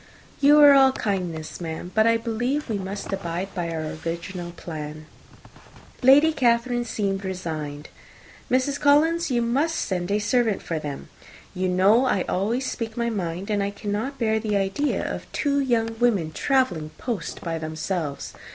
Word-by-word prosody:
"You 290 +1 +6
are 290 -1 +9
all 270 -1 +6
kindness, 180 -8 -3
madam; 165 +1 -5
but 220 +1 +4
I 230 0 +4
believe 245 +5 -2
we 210 -3 -1
must 195 +1 -5
abide 185 0 -4
by 175 -2 -3
our 160 -2 -4
original 175 +1 -4
plan." 155 -2 -7 1.0
Lady 285 +5 +6
Catherine 240 -2 +1
seemed 200 -3 -2
resigned. 155 -6 -5 0.6
"Mrs. 260 +3 +1
Collins, 315 +4 +3
you 240 -2 +1
must 280 +8 +1
send 180 -1 -2
a 205 - +2
servant 215 0 0
with 160 -2 -1
them. 145 -2 -6 0.4
You 185 0 -1
know 200 +7 +4
I 195 -7 +1
always 225 +8 -1
speak 225 -3 -4
my 235 0 0
mind, 185 -1 -3
and 205 -1 +1
I 200 - 0
cannot 210 +7 -4
bear 220 -3 +1
the 215 -1 -1
idea 195 +9 0
of - - -5
two 285 -1 0
young 230 -4 0
women 205 -10 +2
travelling 185 - 0
post 230 -9 -4
by 165 -1 -3
themselves. 155 -1 -4
205 Hz, 160 wpm, -24 LUFS, 175-245 Hz, 1.0 s, are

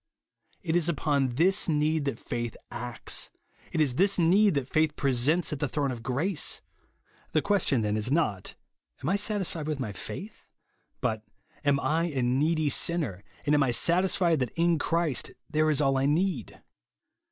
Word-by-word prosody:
It 165 -2 -1
is 175 -1 +2
upon 140 -5 0
this 185 +6 +3
need 155 0 +1
that 140 -5 -2
faith 120 -1 -4
acts; 120 0 -4 0.4
it - - -2
is 145 -5 +3
this 195 +3 +4
need 190 +2 +4
that 135 -3 -1
faith 155 0 +1
presents 140 +6 +2
at 145 - -4
the 145 - 0
throne 140 -1 -1
of 120 -2 -6
grace. 145 - 0 0.7
The 155 - +3
question, 190 - +2
then, 105 -1 0
is 110 +2 -2
not. 135 - 0 0.5
Am 145 - -1
I 195 - +2
satisfied 200 -7 -1
with 155 -2 -2
my 110 -6 -3
faith? 205 - -8 0.5
but, 110 -3 -1 0.4
Am 145 -1 +3
1 160 +4 0
a 130 -2 0
needy 150 +5 +1
sinner, 140 - -1 0.2
and 145 - +2
am 145 - +4
I 135 - +2
satisfied 170 +3 +2
that 125 -2 -1
in 170 -1 +2
Christ 165 -3 -1
there 155 0 +1
is 150 - +1
all 135 -2 +2
I 135 - +1
need 155 - -1
150 Hz, 170 wpm, -28 LUFS, 130-170 Hz, 0.7 s, this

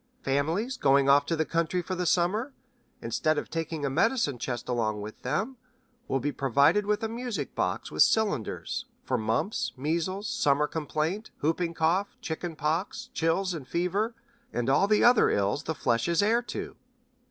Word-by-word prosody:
Families 165 - 0
going 140 0 +4
off 140 +1 +5
to 165 - +1
the 160 0 0
country 170 +2 0
for 185 - -4
the 180 -1 -1
summer, 205 - +1 0.5
instead 155 +7 0
of - - -4
taking 160 -2 -3
a - - +1
medicine 165 - +1
chest 120 -1 -4
along 110 -4 0
with 105 +1 -8
them, 225 - -2 0.5
will 135 - 0
be 145 +3 -1
provided 140 - +3
with 210 +1 0
a - - +1
music 230 - -4
box - - -2
with 75 - 0
cylinders 200 - +1 0.2
for - - -1
mumps, 110 - -1
measles, 170 +8 -1
summer 145 -3 +2
complaint, 160 +6 -2
whooping 165 +2 0
cough, 175 +6 +1
chicken 165 0 -4
pox, 155 +5 -2
chills 175 +3 +1
and 150 -6 -7
fever, 195 - -1 0.4
and 120 +2 0
all 170 +8 +4
the 210 0 +3
other 240 -2 +6
ills 100 +9 0
the 160 - -2
flesh 115 -3 +1
is 170 +3 +2
heir 230 +3 +3
to. 240 - -6
165 Hz, 170 wpm, -28 LUFS, 140-200 Hz, 0.5 s, other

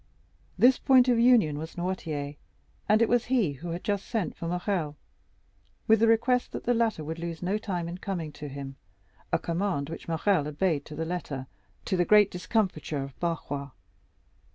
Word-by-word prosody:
This 250 +1 +5
point 260 -2 +5
of 240 -2 +4
union 230 -12 +4
was 160 +1 -7
Noirtier, 155 -5 -3 0.5
and 215 +2 +5
it - - +3
was 240 0 +2
he 240 - +2
who 155 +5 -7
had 170 +2 -4
just 205 -2 -1
sent 220 -6 -2
for 165 - -5
Morrel, 175 -3 -1 0.9
with 220 0 +5
the 230 - +4
request 235 +2 +2
that - - -5
the 245 - +2
latter 225 -8 +1
would 160 +2 -5
lose 170 0 -5
no 195 +4 0
time 180 -6 -3
in 175 +2 -6
coming 175 -6 -4
to 150 0 -8
him—a 95 -10 -7
command 170 -4 -2
which 165 - -8
Morrel 165 -1 +1
obeyed 150 0 0
to 150 - -9
the 160 +2 -3
letter, 155 -6 -4 0.4
to - - 0
the 175 - +4
great 210 +2 +5
discomfiture 180 -6 -1
of 135 -1 -10
Barrois. 145 -5 -3
175 Hz, 175 wpm, -28 LUFS, 150-210 Hz, 0.9 s, This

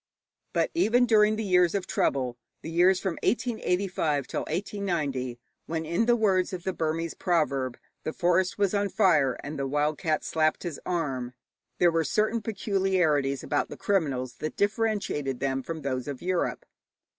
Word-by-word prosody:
But - - +1
even 245 -7 +3
during 215 -2 +4
the 220 - -3
years 180 -2 +3
of 195 - -1
trouble, 130 -3 0 0.3
the 160 - -5
years 180 +3 +4
from 190 -4 -3
1885 180 - 0
till - - -3
1890, 155 - -2 0.3
when, 160 0 -2
in 170 +9 0
the 240 - +5
words 195 -5 +2
of 180 -2 -5
the 190 - -1
Burmese 165 0 -2
proverb, 140 -8 0 0.3
'the 155 - -3
forest 180 0 +1
was 200 -1 +1
on 200 -1 +1
fire 175 - +3
and 145 0 -5
the 135 - -1
wild 150 +2 0
cat 155 -1 0
slapped 155 -1 +1
his 170 -5 -5
arm,' 135 -8 -2 0.4
there 175 -1 +4
were 165 0 +1
certain 215 +8 +1
peculiarities 185 -10 +1
about 145 - 0
the - - -8
criminals 135 -11 -1
that 155 - -4
differentiated 205 - 0
them 135 -1 -1
from 160 +3 -6
those 130 -2 -2
of 140 -3 -5
Europe. 180 -1 -1
170 Hz, 165 wpm, -27 LUFS, 145-195 Hz, 0.4 s, the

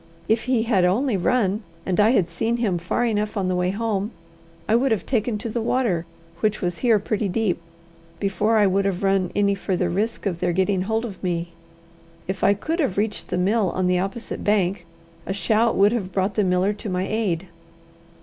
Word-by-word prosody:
If 220 +1 +1
he 250 -3 +2
had 220 -6 +2
only 220 +7 +2
run, 200 +1 +1 0.2
and 185 0 0
I 210 +1 +6
had 200 -8 +3
seen 225 +8 -1
him 200 -7 0
far 180 +8 0
enough 210 -2 -1
on 190 -2 0
the 185 - 0
way 180 0 +1
home, 205 0 -1 0.6
I 220 - +3
would 255 +2 +2
have 220 - 0
taken 230 -3 0
to 210 - -5
the 230 +1 -2
water, 220 -9 0 0.3
which 215 +2 +1
was 175 -1 -2
here 235 -4 +4
pretty 210 +1 -1
deep, 185 -3 0 0.6
before 210 +3 +1
I 210 - +5
would 195 +1 +2
have 195 -1 -1
run 195 -2 +2
any 200 -1 +3
further 185 -2 -1
risk 215 +6 -2
of 180 -4 -1
their 175 -1 0
getting 190 +1 +1
hold 225 +1 0
of 200 -5 -8
me. 175 -1 -1 0.8
If 190 +1 -4
I 200 +1 +5
could 320 - -3
have 270 - 0
reached 210 +1 -1
the - - -2
mill 200 +2 +2
on 185 - 0
the 180 0 +2
opposite 195 +5 -4
bank, 190 -4 +1 0.4
a 190 - -1
shout 220 +3 +2
would 200 +2 +5
have 205 -6 -2
brought 190 +2 0
the 210 - +1
miller 185 +2 +2
to 205 0 -6
my 185 +1 -1
aid. 190 -5 -1
200 Hz, 205 wpm, -23 LUFS, 185-220 Hz, 0.8 s, I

